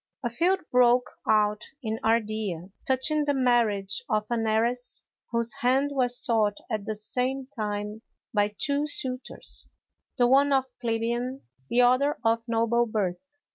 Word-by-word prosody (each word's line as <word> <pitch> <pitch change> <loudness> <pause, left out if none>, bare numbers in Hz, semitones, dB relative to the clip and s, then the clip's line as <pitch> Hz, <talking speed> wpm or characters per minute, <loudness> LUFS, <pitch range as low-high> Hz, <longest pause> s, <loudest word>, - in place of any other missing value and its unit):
_ - - +3
A - - -5
feud 360 +9 +2
broke 250 0 +4 0.2
out 210 -1 +3 0.2
in 220 0 -2
Ardea 215 -5 -1 0.2
touching 285 +3 +2
the 290 -1 +1
marriage 230 -7 +1
of 215 0 +1
an 225 -2 0
heiress, 240 +3 0 0.3
whose 235 0 +1
hand 265 +3 +2
was 245 -2 +2
sought 220 -6 +2
at 215 -2 -2
the 215 - -2
same 250 +5 -1
time 210 -1 -3 0.3
by 205 0 +1
two 285 +1 0
suitors, 260 -5 -4 0.5
the 245 - +4
one 275 +3 +4
of 265 -1 +3 0.2
plebeian, 235 +3 -2 0.3
the 245 - +3
other 255 +4 +3
of 225 0 +3
noble 230 +1 +2
birth. 215 +6 -3
235 Hz, 145 wpm, -27 LUFS, 215-260 Hz, 0.5 s, broke